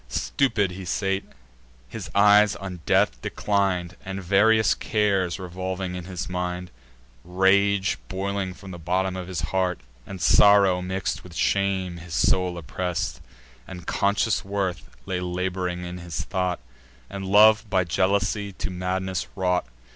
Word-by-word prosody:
Stupid 110 -9 0
he 95 +1 -7
sate, 95 +2 -1 0.6
his - - -7
eyes 105 0 +6
on 95 -2 -7
earth - - +3
declin'd, 95 -4 -1
And 95 0 -5
various 110 +4 +4
cares 100 -5 0
revolving 95 0 -4
in 90 -1 -6
his 90 -1 -5
mind: 90 -1 -4 0.5
Rage, 95 0 +2
boiling 95 -1 -3
from 95 0 -11
the 85 - -8
bottom 90 +3 -1
of 90 -1 -5
his 90 -4 -4
breast, 90 -5 -1 0.3
And 95 - -7
sorrow 100 -1 +5
mix'd 95 +1 -3
with 90 -2 -13
shame, 95 0 0
his 85 -1 -7
soul 90 +5 +2
oppress'd; 90 +3 -3 0.5
And 90 -2 -9
conscious 100 +2 +1
worth 95 -7 -3 0.2
lay 95 -2 -2
lab'ring 90 0 -3
in 90 +1 -6
his 85 -2 -5
thought, 90 -2 -2 0.5
And 100 0 -6
love 105 +2 +5
by 95 -2 +2
jealousy 100 +3 0
to 95 - -5
madness 90 0 -2
wrought. 90 -6 0
95 Hz, 140 wpm, -25 LUFS, 90-100 Hz, 0.6 s, eyes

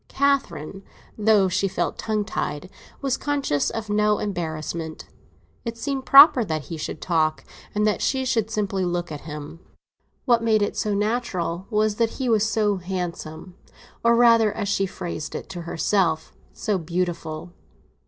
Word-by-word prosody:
Catherine, 195 - 0 0.3
though 210 -2 +4
she 190 +2 +1
felt - - -2
tongue 215 -2 -1
tied, 150 +1 -4 0.3
was 270 -2 +1
conscious 280 - 0
of 225 -1 -5
no 210 0 +2
embarrassment; 160 -4 -4 0.6
it 230 -1 -5
seemed 270 +2 -3
proper 275 -3 +9
that 155 -6 -3
he 165 - -7
should 155 - -5
talk, 160 -3 +1 0.3
and 210 0 +2
that 210 - +1
she 265 -1 0
should 225 -4 0
simply 200 -3 -1
look 175 -1 -2
at 150 - -6
him. 150 +2 -7 0.7
What 240 -3 +4
made 220 -2 +3
it - - -1
natural 200 -4 -1
was 215 -1 +1
that 230 -1 +2
he 260 - -2
was 220 -1 +3
so 210 -2 +1
handsome, 175 -2 -5 0.5
or 235 0 +5
rather, 230 -2 +5
as 205 -1 -3
she 195 -1 +1
phrased 175 -4 -6
it - - -6
to 180 -3 -6
herself, 165 -3 0 0.2
so 205 -4 -1
beautiful. 170 -1 -3
200 Hz, 155 wpm, -24 LUFS, 170-225 Hz, 0.7 s, proper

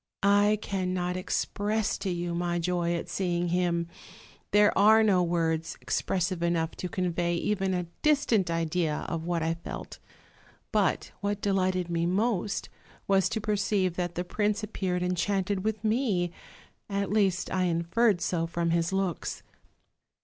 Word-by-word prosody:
I 205 +1 +4
cannot 180 -2 -1
express 205 +3 -1
to 195 - -2
you 175 -1 -2
my 175 0 -1
joy 175 0 0
at 170 - -4
seeing 175 -2 -1
him; 170 -1 +1 0.6
there 205 0 +4
are 220 +3 +6
no 195 -4 +4
words 165 -2 0
expressive 185 -1 -1
enough 170 -1 +1
to 180 - -4
convey 175 -1 0
even 190 +1 0
'a 180 - -1 0.2
distant 260 - +3
idea 165 -1 -1
of 165 -1 -3
what 170 -2 0
I 165 +1 +1
felt. 165 0 -8 0.7
But - - +1
what 205 0 -1
delighted 185 -3 +1
me 170 0 +1
most 205 +2 0 0.4
was 195 -1 +3
to 220 - -2
perceive 200 -3 0
that 175 -1 -2
the 175 - -1
prince 210 +3 -1
appeared 185 -4 -2
enchanted 190 +2 0
with 220 0 -2
me; 215 -6 +1 0.6
at 200 -1 -1
least, 195 -4 +1
I 185 -1 +2
inferred 175 +4 +2
so 165 0 0
from 170 0 -1
his 170 +1 +1
looks. 190 -3 -2
180 Hz, 145 wpm, -28 LUFS, 170-200 Hz, 0.7 s, are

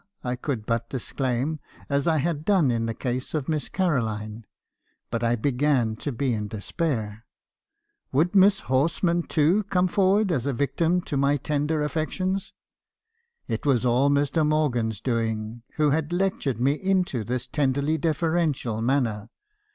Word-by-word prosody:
I 125 0 -1
could 125 -4 -4
but 115 0 -1
disclaim, 130 +3 -2 0.3
as 140 +1 0
I 160 -1 +3
had 155 0 -1
done 175 -8 +3
in 115 -1 -1
the 115 - -2
case 125 +5 -3
of 145 -4 -2
Miss 155 -2 -2
Caroline; 110 - -1 0.6
but 115 0 -2
I 115 +1 +2
began 125 -2 +1
to 145 - -3
be 125 +1 -1
in 105 -2 -2
despair. 110 - -3 0.9
Would 160 +7 +2
Miss 195 0 +5
Horsman, 165 +6 +1
too, 165 +5 +2
come 185 -2 +2
forward 195 +2 +2
as 135 -5 0
a 140 - 0
victim 165 +7 +1
to 145 - -3
my 140 +1 +3
tender 150 +2 -1
affections? 185 +6 -2 1.0
It - - -3
was 130 -4 +2
all 125 +4 +3
Mr. 145 +3 +2
Morgan's 125 -8 0
doing, 115 -2 -2
who 150 -2 +3
had 155 +2 0
lectured 175 - 0
me 135 +3 +3
into 180 - 0
this 125 +3 -3
tenderly 140 +3 0
deferential 160 -8 0
manner. 115 -4 0
140 Hz, 150 wpm, -25 LUFS, 120-160 Hz, 1.0 s, Miss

